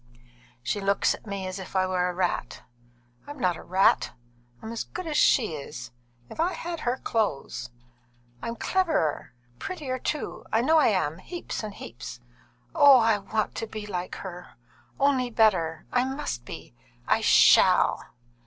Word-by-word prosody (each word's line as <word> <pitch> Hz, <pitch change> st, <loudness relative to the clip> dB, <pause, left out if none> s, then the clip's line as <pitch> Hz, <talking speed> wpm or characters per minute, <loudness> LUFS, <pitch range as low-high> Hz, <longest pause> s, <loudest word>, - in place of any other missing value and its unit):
"She 205 Hz, -, -2 dB
looks 195 Hz, 0 st, +2 dB
at -, -, -12 dB
me 200 Hz, -2 st, -4 dB
as 185 Hz, +1 st, -5 dB
if 190 Hz, -, -9 dB
I 185 Hz, 0 st, +3 dB
were 180 Hz, -1 st, 0 dB
a -, -, -3 dB
rat. 180 Hz, -1 st, -2 dB, 0.6 s
I'm 290 Hz, 0 st, -8 dB
not 180 Hz, -8 st, +1 dB
a -, -, -10 dB
rat! 190 Hz, +2 st, +2 dB, 0.5 s
I'm 220 Hz, -, -7 dB
as 230 Hz, -, -3 dB
good 365 Hz, -, -7 dB
as 310 Hz, -2 st, -3 dB
she 230 Hz, -, +4 dB
is, 140 Hz, -4 st, -7 dB, 0.4 s
if -, -, -12 dB
I 350 Hz, +3 st, +1 dB
had 340 Hz, 0 st, -5 dB
her 245 Hz, -2 st, -1 dB
clothes. 215 Hz, -, -2 dB, 0.7 s
I'm 230 Hz, -, -4 dB
cleverer, 315 Hz, -, 0 dB, 0.2 s
and 120 Hz, -, -32 dB
prettier, 280 Hz, -8 st, -4 dB
too, 300 Hz, +4 st, -4 dB
I 225 Hz, -, +3 dB
know 315 Hz, +6 st, +4 dB
I -, -, +5 dB
am 175 Hz, -7 st, 0 dB
heaps 350 Hz, -1 st, -6 dB
and 215 Hz, -2 st, -7 dB
heaps. 120 Hz, +1 st, -9 dB, 0.5 s
Oh! 280 Hz, -2 st, +8 dB
I 225 Hz, -3 st, +3 dB
want 210 Hz, +2 st, -2 dB
to 225 Hz, -, -4 dB
be 215 Hz, -1 st, -7 dB
like 180 Hz, -3 st, -4 dB
her, 180 Hz, -2 st, -9 dB, 0.4 s
only 270 Hz, -3 st, +2 dB
better 180 Hz, -9 st, +2 dB
I 250 Hz, -, +3 dB
must 265 Hz, -, -4 dB
be -, -, -9 dB, 0.3 s
I -, -, +3 dB
shall!" -, -, +5 dB
215 Hz, 165 wpm, -26 LUFS, 180-265 Hz, 0.7 s, Oh